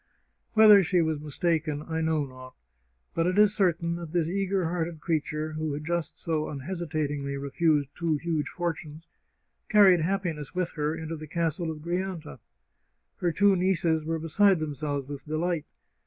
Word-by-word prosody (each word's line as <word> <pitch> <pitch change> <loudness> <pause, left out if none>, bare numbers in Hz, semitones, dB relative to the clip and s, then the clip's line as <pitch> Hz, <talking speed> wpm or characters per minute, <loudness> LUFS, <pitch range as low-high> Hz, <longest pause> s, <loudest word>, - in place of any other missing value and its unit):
Whether 215 -2 +8
she 180 -1 +2
was 160 -2 -1
mistaken 155 0 -1
I 160 -1 -2
know 160 -2 +1
not, 130 -1 -12 0.6
but 165 +1 +1
it 185 +2 0
is 210 -1 +6
certain 170 -4 +1
that 170 -2 -7
this 170 -3 +1
eager 195 0 0
hearted 165 -1 -2
creature, 155 -1 -2
who 155 0 -3
had 150 +1 -5
just 170 -1 -2
so 155 -2 -1
unhesitat 155 0 -3
ingly 140 -1 -3
refused 145 0 +1
two 165 -2 0
huge 160 -1 -2
fortunes, 165 -2 -5 0.6
carried 200 -4 +7
happiness 170 -4 -2
with 180 -1 -1
her 150 0 -1
into 160 0 -5
the 155 0 -8
Castle 165 +1 -1
of 155 -1 -6
Grianta. 175 -5 -4 0.8
Her 175 - 0
two 200 +4 +4
nieces 175 -4 +1
were 165 +1 -1
beside 185 +5 +3
themselves 145 -3 -3
with 145 -1 -7
delight. 160 +1 -1
160 Hz, 160 wpm, -27 LUFS, 150-175 Hz, 0.8 s, Whether